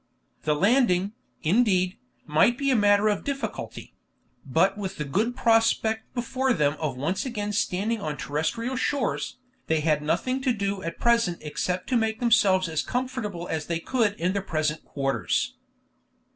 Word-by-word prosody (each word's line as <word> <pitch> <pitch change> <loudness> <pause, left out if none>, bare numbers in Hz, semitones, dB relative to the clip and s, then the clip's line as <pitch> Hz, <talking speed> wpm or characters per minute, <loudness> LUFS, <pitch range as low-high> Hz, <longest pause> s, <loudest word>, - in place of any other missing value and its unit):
The 150 - +2
landing, 200 - +3 0.3
indeed, 185 0 +2 0.3
might 160 +11 +3
be 275 -1 +1
a - - +4
matter 205 -1 +4
of 205 -2 0
difficulty; 230 - -5 0.5
but 165 +9 +2
with 200 -2 -5
the 150 - -3
good 215 - 0
prospect 225 -1 +2
before 255 +2 0
them 150 -4 +1
of 150 -5 -2
once 160 +8 -1
again 210 -5 -3
standing 210 +1 0
on 150 -4 -3
terrestrial 230 - -2
shores, 260 -1 -1 0.3
they 160 -1 +1
had 150 -1 +2
nothing 255 - 0
to 260 -2 +2
do 200 -2 -2
at 165 -1 -5
present 235 -7 +2
except 180 +4 -2
to 255 - +3
make 220 -1 0
themselves 205 -6 +4
as 160 -2 -1
comfortable 245 -9 -3
as 155 -1 -3
they 170 -1 -1
could 220 +2 +1
in 180 +3 +1
their 200 - -1
present 155 -4 -1
quarters. 135 -1 -1
200 Hz, 160 wpm, -26 LUFS, 165-235 Hz, 0.5 s, a